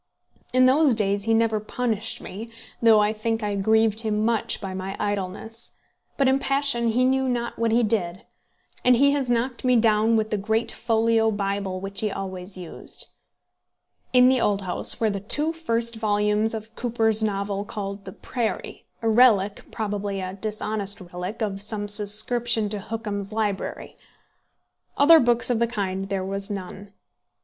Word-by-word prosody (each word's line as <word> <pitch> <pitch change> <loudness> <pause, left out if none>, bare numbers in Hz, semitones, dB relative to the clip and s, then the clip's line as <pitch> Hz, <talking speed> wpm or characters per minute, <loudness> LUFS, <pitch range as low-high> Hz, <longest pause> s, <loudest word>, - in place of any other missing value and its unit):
In 255 0 +4
those 270 0 +4
days 200 -1 0
he 225 - +2
never 225 -1 +2
punished 220 0 -3
me, 220 +5 -8 0.3
though 225 -2 +6
I 210 +1 +2
think 225 +1 -2
I 205 -1 -1
grieved 220 +2 +2
him 215 -1 -1
much 230 -2 0
by 190 -2 -6
my 190 +1 -5
idleness; 205 +3 -4 0.4
but 275 - +3
in 265 +1 +3
passion 275 -4 0
he 245 +3 +2
knew 265 0 +1
not 235 -2 -3
what 230 -1 +1
he 235 +2 +3
did, 190 -5 -1 0.6
and 250 0 +5
he 280 +3 +4
has 280 -3 -1
knocked 245 +1 -1
me 250 -1 +3
down 220 0 +3
with 220 -1 0
the 210 - 0
great 220 +3 -1
folio 225 -1 +1
Bible 200 -2 -2
which 195 +1 -4
he 215 - 0
always 190 -1 -5
used. 175 -3 -7 1.0
In 250 0 +6
the 260 -1 +3
old 205 -1 +1
house 180 - +2
were 220 -2 +1
the 200 - -3
two 295 +11 0
first 235 -8 -2
volumes 210 0 +1
of 220 +1 -9
Cooper's 225 -2 +1
novel, 200 -1 -1
called 200 -2 -6
The 190 - -7
Prairie, 240 -4 -4 0.2
a - - +1
relic 215 -4 +3
probably 205 -2 -3
a 185 0 -4
dishonest 210 0 -2
relic 180 +4 -6
of 200 -2 -3
some 210 0 -3
subscription 215 +2 +2
to 210 0 -2
Hookham's 210 -1 -5
library. 215 -3 -3 1.0
Other 320 +3 +8
books 240 -1 +3
of 235 - +1
the 235 - +2
kind 195 -4 -3
there 195 -1 -2
was 195 +1 -4
none. 200 0 -7
215 Hz, 165 wpm, -24 LUFS, 200-235 Hz, 1.0 s, Other